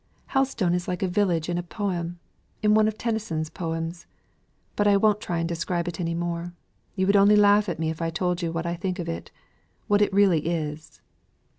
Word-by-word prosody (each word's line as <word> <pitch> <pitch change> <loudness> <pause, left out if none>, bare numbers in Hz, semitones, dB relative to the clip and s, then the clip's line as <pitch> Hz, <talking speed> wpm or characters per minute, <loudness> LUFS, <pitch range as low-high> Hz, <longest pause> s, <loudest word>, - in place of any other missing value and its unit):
Helstone 265 -10 +1
is 175 0 -1
like 180 +2 -2
a - - +2
village 180 -4 +1
in 175 0 -1
a - - -1
poem 175 -2 -3 0.5
in 210 0 +4
one 215 0 +5
of 215 0 -2
Tennyson's 210 -10 -2
poems. 165 -1 -4 0.7
But 205 - +2
I 200 -1 +5
won't 210 0 +3
try 175 - -2
and 165 0 -1
describe 170 +1 -2
it 175 0 -5
any 165 -1 -1
more. 175 0 -3 0.4
You 190 -1 +1
would 200 +1 +3
only 200 +1 +6
laugh 205 0 +5
at 175 - -3
me 160 0 -1
if 160 - -7
I 165 - 0
told 180 +2 -1
you 170 -1 -1
what 165 0 -3
I 170 - -1
think 185 +1 -3
of 175 -3 -4
it 165 - -5 0.6
what 205 -1 +3
it 205 - +3
really 190 -6 +3
is." 155 -2 -4
175 Hz, 210 wpm, -25 LUFS, 165-205 Hz, 0.7 s, only